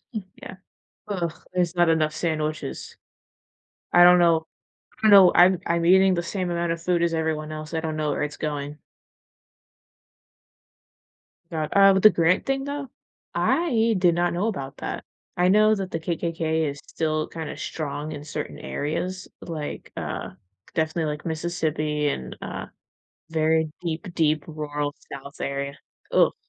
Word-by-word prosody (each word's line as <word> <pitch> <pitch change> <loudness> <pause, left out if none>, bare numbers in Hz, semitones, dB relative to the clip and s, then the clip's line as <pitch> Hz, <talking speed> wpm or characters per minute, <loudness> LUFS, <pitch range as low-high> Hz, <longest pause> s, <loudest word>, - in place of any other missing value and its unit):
Mm, 215 - -2 0.2
yeah, - - -8 0.5
uh, 180 -5 -1 0.2
there's 180 -2 0
not 175 -1 +4
enough 155 -1 +2
sandwiches 155 -2 -3 1.0
I 175 0 +8
don't 180 0 +8
know 165 -2 +3 0.6
I 215 - +6
know 195 -3 +9
I'm 180 0 +6
I'm 170 0 +1
eating 190 +2 +6
the 170 -1 -1
same 185 +1 -3
amount 170 0 -1
of 165 0 -3
food 175 -1 +1
as 170 - +1
everyone 160 -1 -1
else, 155 0 -7
I 165 - 0
don't 160 -1 -3
know 155 -1 0
where 145 - -1
it's 150 0 -4
going. 145 -1 -4 2.7
God, 155 -2 -2
uh, 195 0 +7
with 190 - +1
the 215 - +9
Grant 170 0 +2
thing 270 0 0
though, 285 -1 -4 0.5
I 230 -9 +2
did 175 -2 +4
not 175 +1 +1
know 180 +5 0
about 140 -12 -4
that. - - -5 0.3
I 180 +1 +3
know 215 +2 +5
that 195 -3 -4
the 165 - -2
KKK 160 -2 -1
is 140 +1 -9
still 155 -1 -1
kinda 160 -2 -6
strong 150 0 -4
in 145 -1 -7
certain 150 0 -5
areas, 180 +6 -3
like, 155 -3 -6
uh, - - -4 0.4
definitely, 160 0 0
like, 150 +2 -8
Mississippi 155 -2 -1
and, 65 - -4
uh, - - -6 0.6
very 160 0 +1
deep, 170 +2 -4
deep 155 -3 +2
rural 150 -2 -3 0.2
South 140 +1 -9
area, 140 0 -3 0.3
ugh. - - +4
165 Hz, 155 wpm, -24 LUFS, 155-180 Hz, 2.7 s, know